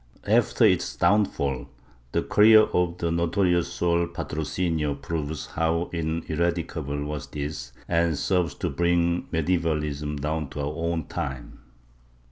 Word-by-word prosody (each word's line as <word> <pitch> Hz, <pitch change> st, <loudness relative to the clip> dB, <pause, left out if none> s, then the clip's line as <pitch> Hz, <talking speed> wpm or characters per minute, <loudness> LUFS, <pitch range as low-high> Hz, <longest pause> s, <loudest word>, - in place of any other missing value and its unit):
After -, -, +3 dB
its -, -, +2 dB
downfall, 70 Hz, -10 st, +1 dB, 0.4 s
the -, -, 0 dB
career 110 Hz, +1 st, +7 dB
of 90 Hz, -3 st, 0 dB
the 85 Hz, -2 st, -1 dB
notorious 85 Hz, +1 st, +1 dB
Sor 85 Hz, 0 st, +1 dB
Patrocinio 80 Hz, -1 st, -2 dB
proves 75 Hz, 0 st, -4 dB
how 80 Hz, +1 st, -1 dB
ineradicable 80 Hz, -2 st, -2 dB
was 75 Hz, -2 st, -5 dB
this 70 Hz, -3 st, -5 dB, 0.2 s
and 85 Hz, -2 st, +1 dB
serves 90 Hz, +3 st, 0 dB
to -, -, -2 dB
bring 85 Hz, +2 st, +1 dB
medievalism 75 Hz, -3 st, -1 dB
down 75 Hz, 0 st, -2 dB
to 75 Hz, -, -7 dB
our 70 Hz, +2 st, -2 dB
own 85 Hz, -1 st, -2 dB
time. 65 Hz, -3 st, -5 dB
80 Hz, 120 wpm, -25 LUFS, 75-85 Hz, 0.4 s, career